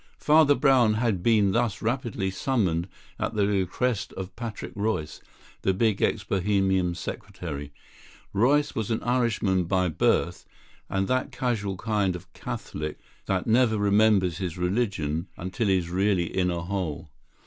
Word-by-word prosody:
Father 150 Hz, -1 st, +5 dB
Brown 130 Hz, -7 st, +4 dB
had 110 Hz, -5 st, 0 dB
been 105 Hz, -2 st, +3 dB
thus 115 Hz, -1 st, 0 dB
rapidly 115 Hz, -5 st, -2 dB
summoned 95 Hz, -6 st, 0 dB, 0.3 s
at -, -, -2 dB
the 105 Hz, -2 st, +3 dB
request 100 Hz, +3 st, 0 dB
of 95 Hz, -1 st, -7 dB
Patrick 115 Hz, -3 st, -6 dB
Royce, 100 Hz, -7 st, -2 dB, 0.4 s
the 95 Hz, -, +1 dB
big 110 Hz, 0 st, +1 dB
ex 105 Hz, -, +1 dB
Bohemian 95 Hz, -2 st, +1 dB
secretary. 85 Hz, -6 st, -6 dB, 0.6 s
Royce 140 Hz, +8 st, +3 dB
was 110 Hz, -3 st, -3 dB
an 110 Hz, -, -1 dB
Irishman 110 Hz, -7 st, +1 dB
by 90 Hz, 0 st, +1 dB
birth; 80 Hz, -, +1 dB, 0.5 s
and 95 Hz, 0 st, 0 dB
that 130 Hz, 0 st, 0 dB
casual 105 Hz, -6 st, -2 dB
kind 100 Hz, -3 st, 0 dB
of 90 Hz, 0 st, -11 dB
Catholic 75 Hz, 0 st, -5 dB, 0.3 s
that 95 Hz, -2 st, 0 dB
never 115 Hz, -1 st, +3 dB
remembers 100 Hz, -3 st, +3 dB
his 90 Hz, -3 st, -3 dB
religion 90 Hz, -4 st, -1 dB
until 95 Hz, +4 st, -2 dB
he 95 Hz, -1 st, +4 dB
is 85 Hz, -1 st, -3 dB
really 95 Hz, -2 st, +1 dB
in 90 Hz, -1 st, +2 dB
a 85 Hz, -1 st, -2 dB
hole. 90 Hz, -6 st, -4 dB
100 Hz, 145 wpm, -26 LUFS, 90-110 Hz, 0.6 s, Father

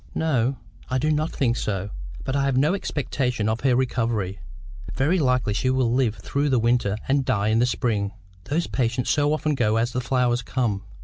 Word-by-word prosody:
"No. 135 Hz, -5 st, +1 dB, 0.3 s
I 130 Hz, -, +1 dB
do 155 Hz, +4 st, +1 dB
not 155 Hz, +1 st, 0 dB
think 120 Hz, -4 st, +1 dB
so. 100 Hz, -1 st, -3 dB, 0.3 s
But 135 Hz, 0 st, -2 dB
I 140 Hz, -1 st, +2 dB
have 135 Hz, -2 st, +1 dB
no 150 Hz, +6 st, +3 dB
expectation 125 Hz, -, -1 dB
of 110 Hz, +1 st, 0 dB
her 130 Hz, -2 st, +3 dB
recovery. 115 Hz, -6 st, -1 dB, 0.6 s
Very 160 Hz, +8 st, +2 dB
likely 125 Hz, -6 st, +1 dB
she 130 Hz, -, 0 dB
will 130 Hz, -2 st, +2 dB
just 120 Hz, -, +1 dB
live 120 Hz, -5 st, +1 dB
through 140 Hz, +8 st, -1 dB
the 130 Hz, -, +3 dB
winter 115 Hz, -3 st, +1 dB
and 135 Hz, 0 st, +2 dB
die 110 Hz, -5 st, +1 dB
in 110 Hz, +1 st, +3 dB
the 120 Hz, -, +3 dB
spring. 105 Hz, -5 st, -1 dB, 0.3 s
Those 165 Hz, +4 st, 0 dB
patients 125 Hz, -1 st, 0 dB
so 145 Hz, -1 st, +2 dB
often 155 Hz, 0 st, 0 dB
go 110 Hz, -5 st, +1 dB
as 115 Hz, +2 st, +1 dB
the 125 Hz, -, -2 dB
flowers 125 Hz, -1 st, +1 dB
come! 115 Hz, -5 st, -2 dB
125 Hz, 200 wpm, -24 LUFS, 115-135 Hz, 0.6 s, no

